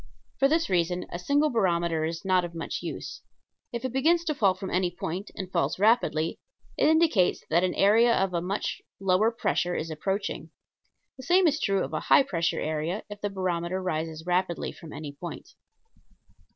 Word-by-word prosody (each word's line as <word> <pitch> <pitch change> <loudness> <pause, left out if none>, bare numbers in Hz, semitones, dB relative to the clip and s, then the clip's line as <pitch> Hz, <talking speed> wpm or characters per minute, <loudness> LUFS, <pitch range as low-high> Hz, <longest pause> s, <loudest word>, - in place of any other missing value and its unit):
For 275 - +5
this 325 +3 +1
reason 180 0 0
a 175 - -4
single 290 +10 +2
barometer 170 -7 +1
is 165 +3 -5
not 185 -1 +3
of 170 -1 -6
much 165 - -4
use. - - -6 0.5
If 235 +1 -4
it 255 - -3
begins 330 +6 +3
to 310 - 0
fall 200 -10 +2
from 190 +1 -6
any 180 0 +1
point, 175 +3 -5
and 185 -1 -6
falls 175 - 0
rapidly, 195 -7 +2 0.4
it - - +3
indicates 315 - +3
that 170 +3 +4
an 185 - 0
area 225 +4 +5
of 190 -1 0
a 170 - 0
much 195 +4 -3 0.2
lower 195 +3 +3
pressure 180 -6 -1
is 160 +1 -3
approaching. 195 +6 -3 0.7
The 260 - -10
same 360 +7 +4
is 305 -2 +2
true 195 -2 +1
of - - -6
a - - 0
high - - +7
pressure 170 -10 -1
area, 155 +6 -2
if 205 0 -8
the 205 - -1
barometer 185 -2 -2
rises 160 -3 -3
rapidly 180 -1 0
from 160 - -12
any 150 -2 -6
point. 170 +4 -8
185 Hz, 185 wpm, -27 LUFS, 170-230 Hz, 0.7 s, high